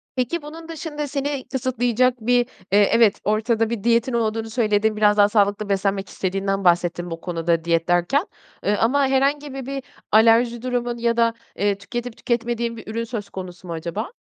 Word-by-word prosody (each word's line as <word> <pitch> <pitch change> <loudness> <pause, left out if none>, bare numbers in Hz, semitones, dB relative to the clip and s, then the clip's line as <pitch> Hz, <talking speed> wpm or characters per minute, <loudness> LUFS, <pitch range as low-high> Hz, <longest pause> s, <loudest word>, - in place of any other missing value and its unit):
Peki, 260 +7 -1
bunun 320 +2 -10
dışında 305 -2 -5
seni 280 -1 -3
kısıtlayacak 255 -1 +1
bir, 245 +2 +3 0.3
eee, 205 0 +5
evet, 230 -3 +4
ortada 220 +1 +1
bir 230 -4 -4
diyetin 235 +2 +2
olduğunu 225 -1 -1
söyledin, 215 -2 +1
biraz 210 0 +4
daha 205 0 +6
sağlıklı 205 -1 +1
beslenmek 195 0 0
istediğinden 195 +1 -2
bahsettin 175 0 +1
bu 165 0 -6
konuda, 170 -2 -1
diyet 165 0 +1
derken, 175 - +2 0.4
ııı, 205 0 +2
ama 275 +4 +2
herhangi 275 +1 +1
bir 270 -2 -6
bir 275 0 -4 0.3
alerji 230 +2 +4
durumun 245 -1 -2
ya 235 0 0
da, 230 -1 +3 0.2
eee, 200 -1 0
tüketip 240 +3 -6
tüketmediğin 235 -1 -2
bir 220 - -11
ürün 230 +1 -2
söz 225 -4 -6
konusu 185 -1 -8
mu 170 - -4
acaba? 170 - -4
225 Hz, 175 wpm, -22 LUFS, 200-250 Hz, 0.4 s, daha